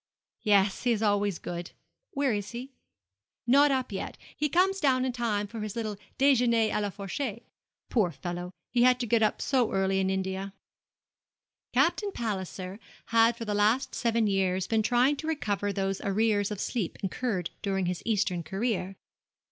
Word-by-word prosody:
'Yes, 200 -2 +3
he 245 - +2
is 225 0 -2
always 205 -3 +2
good. 175 0 -6 0.4
Where 275 -3 0
is 205 -1 -3
he?' 255 +3 -7 0.7
'Not 280 +4 +6
up 260 -4 0
yet. 195 - -5 0.2
He 300 0 0
comes 380 +5 +3
down 260 -5 +3
in 260 - 0
time 230 -4 -1
for 225 +2 -8
his 210 -2 -4
little 220 -3 -3 0.2
déjeûner 240 -5 +4
à - - 0
la 205 - -1
fourchette. 210 +4 -4 0.5
Poor 215 -7 +3
fellow, 175 +3 -5 0.2
he 240 - +2
had 250 0 +5
to - - 0
get 230 0 +2
up 215 - +1
so 255 -5 +2
early 195 0 +1
in 190 0 +1
India.' 190 +1 -3 1.2
Captain 410 -1 +2
Palliser 195 - -4 0.3
had 230 0 +4
for 230 - -5
the 210 - -2
last 215 +5 +2
seven 230 -2 +1
years 190 -2 +1
been 225 -1 +1
trying 250 +6 +3
to 315 - -5
recover 205 -10 -1
those 195 -1 -2
arrears 205 0 +1
of 210 -2 -5
sleep 215 -7 -2
incurred 195 -3 -2
during 195 -2 0
his 180 0 -2
Eastern 205 -5 0
career. 195 +2 -2
215 Hz, 170 wpm, -28 LUFS, 195-245 Hz, 1.2 s, Not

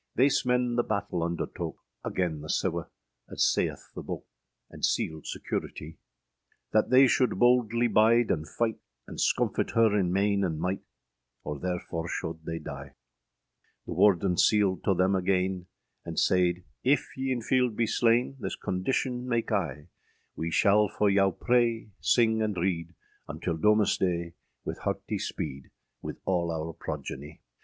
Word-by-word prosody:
Theis 135 +3 +4
men 125 -1 +1
the 120 - +3
battel 100 -5 -2
undertoke 85 +1 -3 0.3
Agen 85 -5 -2
the 75 - -9
sewe, - - -1 0.4
as - - 0
saythe - - -1
the - - -6
boke, - - -6 0.5
And - - -12
sealed 80 -1 0
securitye, 80 +1 -5 0.7
That 110 - +3
they 130 +2 +7
shold 130 0 +2
boldly 120 -1 +3
bide 115 +1 +4
and 80 -1 -1
fyghte, 115 -1 -1 0.3
And - - -9
scomfit - - +1
her 115 -2 +4
in 95 -4 +1
maine 100 +1 +2
and 80 -4 -1
myghte, 90 +3 -1 0.6
Or 75 - -5
therfor 85 -1 -3
sholde 80 -2 -5
they 80 - -3
dye. - - -8 0.9
The - - -5
Warden 95 -1 +3
sealed 100 -3 +3
toe 95 - +2
thayme 95 +2 +2
againe, 90 -1 0 0.4
And - - -7
sayde, 90 -1 +2 0.2
âIf 140 +3 +3
ye 130 0 -2
in 125 -2 -1
fielde 125 -1 +1
be 115 - +1
slaine, 120 +4 +2
This - - -3
condition 125 +6 -2
make 120 -1 0
I: 80 -7 -2 0.5
âWee 80 +1 -3
shall 105 +4 +4
for 100 +1 +1
yow 95 0 +4
praye, 115 +2 +1
syng, 110 -2 +3
and 105 -3 -1
reade, 85 -2 -2 0.3
Until 80 +2 -3
Domesdaye 90 -3 +2 0.3
wyth - - -4
heartye - - -3
speede, 65 0 -5 0.3
With - - -6
al 85 -3 +1
our 80 0 -3
progenie. 75 0 -7
100 Hz, 150 wpm, -28 LUFS, 85-115 Hz, 0.9 s, they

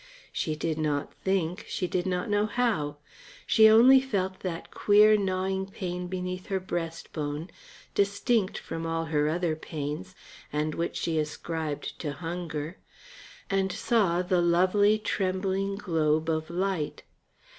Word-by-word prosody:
She 155 - -1
did 155 0 -2
not 150 -2 -1
think, 185 -3 -1
she 185 - -2
did 180 +2 -1
not 180 -1 -1
know 205 0 +2
how. 205 -11 0 0.5
She 220 -1 +7
only 250 +5 +8
felt 190 -7 -2
that 170 -3 -5
queer 210 +1 +6
gnawing 190 -1 0 0.4
beneath 180 0 -4
her 195 -1 0
breastbone, 165 -3 -4 0.4
distinct 200 +1 +1
from 165 0 -5
all 165 0 -1
her 150 0 +3
other 170 0 0
pains, 155 +4 -5 0.4
and 150 +1 -1
which 170 +2 -2
she 160 -2 0
ascribed 155 0 -4
to 150 -3 -3
hunger, 165 0 -5 0.7
and 195 -1 +1
saw 185 -5 +2
the 180 -1 +2
lovely, 185 +5 +4
trembling 195 -1 -1
globe 160 -5 +1
of 155 0 -2
light. 180 -3 -2
180 Hz, 130 wpm, -28 LUFS, 160-195 Hz, 0.7 s, only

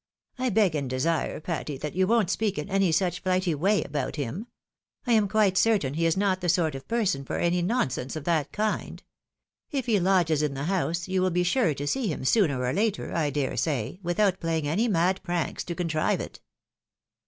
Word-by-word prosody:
" - - -70
I 255 0 +1
beg 205 -5 +3
and 140 -4 -2
desire, 140 +5 -1
Patty, 155 -3 -4
that 150 +2 -5
you 185 +1 +2
won't 220 -4 +2
speak 210 -2 -1
in 205 - -5
any 195 -3 +2
such 175 +1 0
flighty 185 -2 +1
way 195 +7 +2
about 140 -2 -3
Mm. 150 - -4 0.6
I 245 - 0
am 215 -2 +4
quite 195 -2 +3
certain 205 -12 +2
he 165 +2 +1
is 165 - +1
not 190 -2 +1
the 175 - -1
sort 165 -3 +2
of 135 0 -8
person 205 -11 0
for - - -4
any 175 +1 +1
nonsense 170 - -1
of 155 - -5
that 160 -3 0
kind. 215 0 -2 0.7
K 280 -3 0
he 225 -4 +2
lodges 175 -5 +2
in 150 -2 -1
the 135 - -4
house, 175 0 -1
you 185 0 0
wiU 185 0 +2
be 180 +1 +1
sure 180 - +2
to 145 - -4
see 250 - 0
him, 155 -6 -3
sooner 155 - +3
or 125 +1 0
later, 210 +3 -1
I 155 -3 +1
dare 140 -1 -2
say, 140 - -2
without 190 +2 +1
playing 160 -2 -1
any 200 +11 +1
mad 185 -1 +1
pranks 175 -3 -2
to 170 - -4
contrive 165 -3 0
it." - - -7
175 Hz, 210 wpm, -26 LUFS, 155-195 Hz, 0.7 s, am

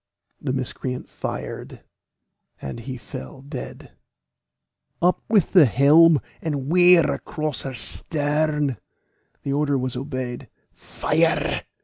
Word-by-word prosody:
The 140 - -2
miscreant 130 -1 -4
fired, - - -6 0.8
and 70 +11 -6
he 130 +2 -6
fell 105 - -9
dead. 140 -2 -8 1.1
"Up 180 +1 +2
with 210 -6 +3
the 175 -7 +8
helm, 150 +6 +6 0.2
and 145 -2 -3
wear 180 -2 +6
across 155 -2 -2
her 135 -2 -5
stern." 150 +1 -1 0.7
The 140 - -2
order 145 -1 +1
was 130 -1 -2
obeyed. 130 -2 -5 0.2
"Fire!" - - 0
140 Hz, 105 wpm, -23 LUFS, 130-155 Hz, 1.1 s, the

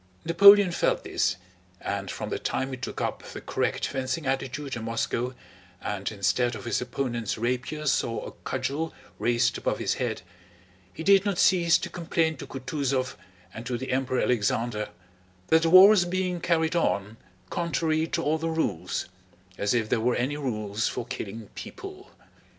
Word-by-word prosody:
Napoleon 200 +3 +8
felt - - +1
this, - - 0 0.4
and 100 -1 -3
from - - -5
the - - -2
time 130 +1 -2
he 130 - -4
took 125 - -5
up - - -2
the - - -8
correct - - -1
fencing 130 +3 -2
attitude 135 +1 -2
in 115 - -5
Moscow 115 +2 -2 0.4
and 100 0 -3
instead 120 +4 +1
of - - -8
his 120 - 0
opponent's 120 -3 -2
rapier 125 +6 -2
saw 115 -4 0
a - - -7
cudgel 140 +5 -2 0.2
raised 120 0 +2
above - - -1
his - - 0
head, - - -3 0.7
he 160 - -7
did 195 +1 +6
not 200 -3 -1
cease 170 -2 +5
to - - -5
complain 165 -2 0
to 140 - -8
Kutúzov 135 -1 -2 0.4
and 115 - -7
to 125 -1 -1
the 130 +2 -5
Emperor 130 0 0
Alexander 110 -1 0 0.6
that 160 0 +5
the 165 - +2
war 185 +3 +10
was 205 -4 +5
being 180 -1 -1
carried 165 0 +1
on 105 - 0 0.3
contrary 165 -2 0
to 165 0 -2
all 155 +2 +1
the 165 +1 -1
rules—as 90 - -3
if 115 -2 +1
there 110 - +1
were 125 +1 +2
any 130 +4 -1
rules 110 -6 -2
for 120 - -3
killing 110 -2 -6
people. 385 +1 -9
130 Hz, 165 wpm, -27 LUFS, 115-165 Hz, 0.7 s, war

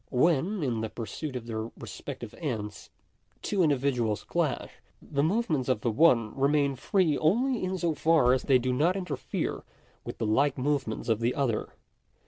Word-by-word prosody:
When, 165 +7 +2
in 120 -5 -1
the 110 - -3
pursuit 125 +6 -6
of 120 -2 -5
their 110 -1 -4
respective - - -8
ends, 110 -10 -4 0.5
two 200 -2 0
individuals 130 -8 +1
clash, - - -1 0.3
the 140 -2 -2
movements 160 - 0
of 125 -5 +1
the 120 - 0
one 115 -4 +3
remain 140 0 +2
free 160 +2 +1
only 235 +9 +2
in 185 +1 -1
so 170 -2 0
far 150 -4 +4
as 130 - +1
they 135 - +4
do 125 +1 -1
not 160 +8 +2
interfere 180 -2 -3 0.4
with - - -7
the - - -2
like 135 +6 +2
movements 135 -4 -1
of 110 -2 +2
the 120 +2 0
other. 125 -6 -1
140 Hz, 165 wpm, -28 LUFS, 120-165 Hz, 0.5 s, far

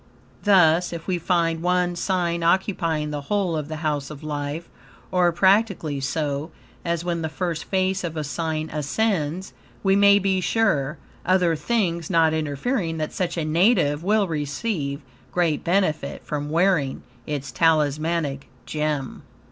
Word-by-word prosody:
Thus, 180 -3 +5
if 165 -1 -6
we 180 -2 -1
find 165 -1 +1
one 180 0 +1
sign 170 -1 0
occupying 165 -3 +1
the 145 -1 -3
whole 190 +2 0
of 150 -2 -3
the 155 - -5
House 145 -3 -1
of 150 0 -10
Life, 150 +2 -4 0.4
or 180 -2 +3
practically 190 -5 +2
so, 145 +2 -2 0.3
as 170 -1 -2
when 170 -1 -1
the 160 - -2
first 165 +2 -3
face 190 0 0
of 165 -2 -4
a 155 - -1
sign 155 +1 -3
ascends, 165 +2 -1 0.3
we 195 -1 +4
may 200 0 +6
be 190 -1 +1
sure, 170 -8 +1 0.3
other 180 -3 +3
things 170 -4 -1
not 165 -3 +4
interfering, 160 - -1
that 155 -1 -3
such 180 -1 -2
a 160 - -1
native 160 -2 +3
will 205 +1 +2
receive 145 -1 -2 0.3
great 165 -4 +1
benefit 170 -6 0
from 145 0 -3
wearing 165 -4 +1 0.2
its 140 -2 -4
Talismanic 155 -2 +1 0.2
gem. 150 -3 -2
165 Hz, 145 wpm, -23 LUFS, 150-185 Hz, 0.4 s, may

